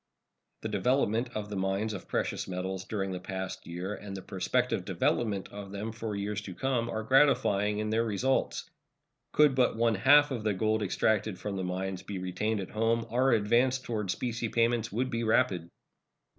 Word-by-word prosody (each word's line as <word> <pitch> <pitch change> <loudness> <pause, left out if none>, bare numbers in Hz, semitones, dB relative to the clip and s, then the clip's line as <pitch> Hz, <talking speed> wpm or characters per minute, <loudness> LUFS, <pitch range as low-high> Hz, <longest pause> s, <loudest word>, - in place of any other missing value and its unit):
The - - -1
development 125 -2 +1
of 105 -1 -3
the - - -3
mines 95 +3 -1
of 100 - -7
precious - - -2
metals 95 +1 -4
during 95 -3 -2
the 90 - -4
past 95 0 -5
year 90 +4 -4
and 100 -2 -7
the 95 - -8
prospective 95 -2 0
development 105 -5 0
of 100 -1 -8
them 105 +3 -4
for 110 -1 -4
years 100 +1 -2
to 95 -3 -8
come 125 -1 0
are 110 -1 -3
gratifying 105 -6 +3
in 110 0 -2
their 115 +1 +2
results. 115 +5 0 0.6
Could 150 -2 +5
but 130 -3 +2
one 115 0 +3
half 145 +8 +6
of 120 -5 -3
the 105 -2 +1
gold 110 +2 +1
extracted 105 0 +1
from 100 +1 -4
the 95 - -2
mines 95 +1 -3
be 100 - -6
retained 95 +4 -1
at 95 - -7
home, 115 +1 +1
our 130 +3 +3
advance 120 +4 +3
toward 110 -6 -4
specie 120 +3 -2
payments 115 0 +1
would 130 +5 -1
be 115 -1 -1
rapid. 100 -7 +2
110 Hz, 185 wpm, -30 LUFS, 95-115 Hz, 0.6 s, half